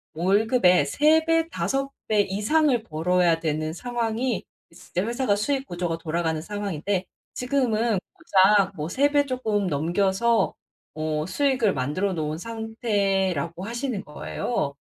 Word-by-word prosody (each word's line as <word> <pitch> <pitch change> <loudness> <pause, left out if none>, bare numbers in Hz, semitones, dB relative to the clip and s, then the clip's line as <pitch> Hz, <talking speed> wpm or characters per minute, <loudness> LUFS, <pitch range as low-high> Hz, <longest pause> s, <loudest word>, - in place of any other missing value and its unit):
월급의 190 - +3
3 310 - +3
배, 330 0 +2
5 275 -4 -1 0.2
배 215 -1 +3
이상을 230 +6 +1
벌어야 170 -1 +1
되는 155 0 -1
상황이 235 +2 -2 0.3
진짜 180 +2 -4
회사가 240 -3 +1
수익 270 +6 -1
구조가 175 -1 -2
돌아가는 160 -1 -1
상황인데 195 -1 -3 0.3
지금은 240 -5 0
고작 200 - +3
뭐 150 0 -3
3 280 +9 +2
배 290 -1 +3
쪼끔 220 -6 -1
넘겨서 190 +9 +1 0.4
어 155 -1 -2
수익을 250 -1 +1
만들어 150 +10 -1
놓은 155 -2 -2
상태라고 195 - -1
하시는 235 -1 -3
거예요. 150 +1 -3
205 Hz, 260 characters per minute, -25 LUFS, 170-240 Hz, 0.4 s, 월급의